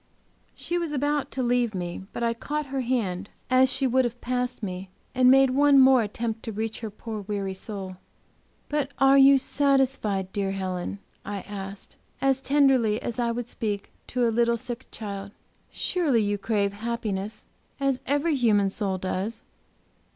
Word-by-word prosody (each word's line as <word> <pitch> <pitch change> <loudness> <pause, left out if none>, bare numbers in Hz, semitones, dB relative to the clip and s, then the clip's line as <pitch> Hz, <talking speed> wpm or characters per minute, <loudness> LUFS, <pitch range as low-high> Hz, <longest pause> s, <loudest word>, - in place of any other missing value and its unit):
She 350 0 -2
was 335 -3 -3
about 290 +1 0
to 260 - -2
leave 240 -3 +1
me, 175 +1 -4
but 235 - -4
I 230 0 +2
caught 300 +6 -3
her 270 - 0
hand 210 -7 -1 0.2
as 255 0 +5
she 270 0 +1
would 260 +1 +3
have 240 0 -3
passed 250 -1 -2
me, 185 -1 -5 0.2
and 250 0 +5
made 270 0 +6
one 285 +1 +5
more 260 -1 +7
attempt 225 +1 -3
to 225 - -5
reach 220 +1 -3
her 225 - -5
poor, 215 +1 -6
weary 200 -1 -3
soul. 190 -1 -7 0.7
"But 295 -2 -1
are 270 0 +6
you 275 0 +8
satisfied, 265 -9 +1
dear 195 -1 -1
Helen?" 185 0 -3 0.3
I 200 -1 -4
asked, 195 -1 -8 0.2
as 270 -1 +2
tenderly 265 -7 +3
as 240 0 -4
I 235 -1 +1
would 235 0 -4
speak 210 -4 -4 0.2
to 245 -1 +1
a 230 - 0
little 235 0 +2
sick 245 +1 -6
child. 200 -2 -7 0.4
"Surely 290 -11 +1
you 205 0 -1
crave 200 -1 0
happiness, 215 -2 -4 0.3
as 275 -2 0
every 290 +3 +1
human 210 -6 +3
soul 195 -2 -1
does!" 190 +4 -3
235 Hz, 165 wpm, -26 LUFS, 205-265 Hz, 0.7 s, you